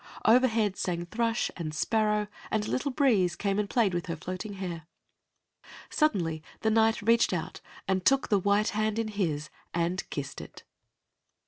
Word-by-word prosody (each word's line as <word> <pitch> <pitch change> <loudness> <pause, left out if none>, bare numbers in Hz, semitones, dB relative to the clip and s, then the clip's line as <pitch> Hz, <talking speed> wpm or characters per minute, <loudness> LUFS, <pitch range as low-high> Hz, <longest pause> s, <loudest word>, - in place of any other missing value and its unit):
Overhead 225 -4 +4
sang 175 -1 -2
thrush 230 +5 0
and 155 -3 -5
sparrow, 210 +4 +1 0.2
and 215 -1 0
a - - -4
little 280 +2 0
breeze 225 - +2
came 200 +2 -1
and 205 -1 -1
played 225 -7 +2
with 175 0 -2
her 165 - -2
floating 185 +5 -6
hair. 175 -4 -6 1.0
Suddenly 175 - +1 0.2
the 220 - +2
Knight 225 0 +3
reached 230 -2 +4
out 170 -3 -4 0.3
and 190 -1 +1
took 275 +7 +3
the 205 - +4
white 205 +2 +2
hand 215 0 -1
in 225 -1 -1
his 160 -8 -2 0.2
and 170 +2 -1
kissed 140 -1 -5
it. - - -12
205 Hz, 160 wpm, -29 LUFS, 175-225 Hz, 1.0 s, Overhead